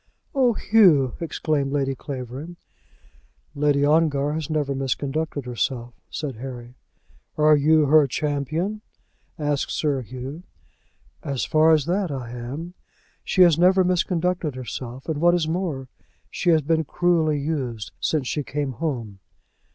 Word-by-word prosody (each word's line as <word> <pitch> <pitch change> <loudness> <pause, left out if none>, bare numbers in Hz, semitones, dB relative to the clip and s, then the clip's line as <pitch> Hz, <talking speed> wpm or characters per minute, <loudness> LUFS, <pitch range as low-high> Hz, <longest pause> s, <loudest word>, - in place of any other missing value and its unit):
"Oh, 255 -4 +3
Hugh!" 180 - +4
exclaimed 155 -4 -1
Lady 135 -1 0
Clavering. 135 +5 -7 1.0
"Lady 145 -1 +2
Ongar 150 -2 +2
has 155 -1 -4
never 150 -3 0
misconducted 140 +2 -2
herself," 120 0 -3 0.2
said 140 -7 -5
Harry. 120 -1 -8 0.6
"Are 155 0 +6
you 155 +1 +4
her 150 0 +5
champion?" 155 +9 -2 0.6
asked 145 -3 -1
Sir 145 -4 0
Hugh. 130 - -7 0.8
"As 140 -4 -2
far 155 +1 +4
as 155 -3 +3
that, 185 +1 0
I 130 -5 -5
am. 135 +9 -6 0.5
She 185 - +4
has 170 -3 +5
never 185 +1 +5
misconducted 180 -4 0
herself; 125 +1 -7
and 155 -2 -2
what 175 +1 +5
is 165 -3 0
more, 160 -6 -2 0.4
she 175 - -1
has 160 -3 +4
been 160 +2 +1
cruelly 160 -2 +1
used 130 -8 -3
since 150 -5 0
she 150 - -1
came 145 0 -3
home." 115 -7 -4
150 Hz, 135 wpm, -23 LUFS, 135-165 Hz, 1.0 s, Are